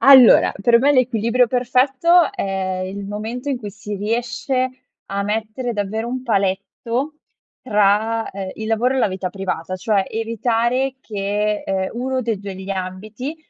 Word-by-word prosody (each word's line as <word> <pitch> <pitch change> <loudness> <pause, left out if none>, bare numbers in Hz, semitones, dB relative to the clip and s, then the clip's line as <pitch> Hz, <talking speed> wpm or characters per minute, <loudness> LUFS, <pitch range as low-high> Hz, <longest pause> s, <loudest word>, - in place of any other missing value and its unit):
Allora, 265 -3 +8
per 235 +2 +6
me 280 +4 +4
l'equilibrio 245 -2 +2
perfetto, 270 - +3
è 190 - -2
il 200 +1 -6
momento 220 +7 -5
in 275 - 0
cui 210 -4 -7
si 205 +1 -6
riesce 235 +4 -1 0.4
a 200 0 -2
mettere 220 +4 -2
davvero 215 +1 -2
un 255 +1 -3
paletto 230 +6 -1 0.5
tra, 215 +1 +2
ehm, 195 -1 -5
il 220 - -6
lavoro 240 +4 +2
e - - +1
la 250 - +3
vita 185 -1 -3
privata, 185 -2 -4
cioè, 195 +1 +1
evitare 235 +3 0
che, 210 -1 -1
ehm, 190 -1 0
1 255 +1 -1
dei 225 -3 -1
2 200 -1 -7
degli 190 +1 -7
ambiti, 200 - -5
225 Hz, 150 wpm, -20 LUFS, 200-250 Hz, 0.5 s, Allora